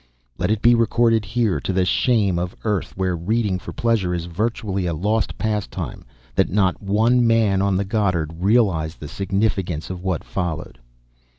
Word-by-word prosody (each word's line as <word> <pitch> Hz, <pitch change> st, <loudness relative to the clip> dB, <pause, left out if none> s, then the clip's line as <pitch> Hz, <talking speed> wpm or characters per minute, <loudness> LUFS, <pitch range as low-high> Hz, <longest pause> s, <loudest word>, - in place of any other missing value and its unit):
Let -, -, 0 dB
it 110 Hz, -1 st, 0 dB
be 120 Hz, -, +7 dB
recorded 115 Hz, -1 st, +3 dB
here, 115 Hz, -2 st, 0 dB
to -, -, -3 dB
the 95 Hz, -1 st, +1 dB
shame 100 Hz, -3 st, +2 dB
of 90 Hz, +1 st, -3 dB
an -, -, -25 dB
Earth 105 Hz, -4 st, -1 dB
where 95 Hz, -1 st, 0 dB
reading 100 Hz, +2 st, 0 dB
for -, -, -8 dB
pleasure 110 Hz, -7 st, 0 dB
is 85 Hz, -1 st, -3 dB
virtually 100 Hz, 0 st, -2 dB
a 85 Hz, -, -1 dB
lost 105 Hz, +6 st, -1 dB
pastime, 105 Hz, -, -3 dB, 0.3 s
that -, -, +2 dB
not 95 Hz, -1 st, +1 dB
one 115 Hz, +5 st, +3 dB
man 110 Hz, -4 st, +3 dB
on 100 Hz, -1 st, +1 dB
the 100 Hz, -, 0 dB
Goddard 95 Hz, -6 st, 0 dB
realized 95 Hz, -6 st, +2 dB
the 75 Hz, -, -7 dB
significance 95 Hz, -2 st, -1 dB
of 90 Hz, -1 st, -6 dB
what 95 Hz, -4 st, -2 dB
followed. 80 Hz, -8 st, -4 dB
100 Hz, 175 wpm, -22 LUFS, 90-110 Hz, 0.3 s, be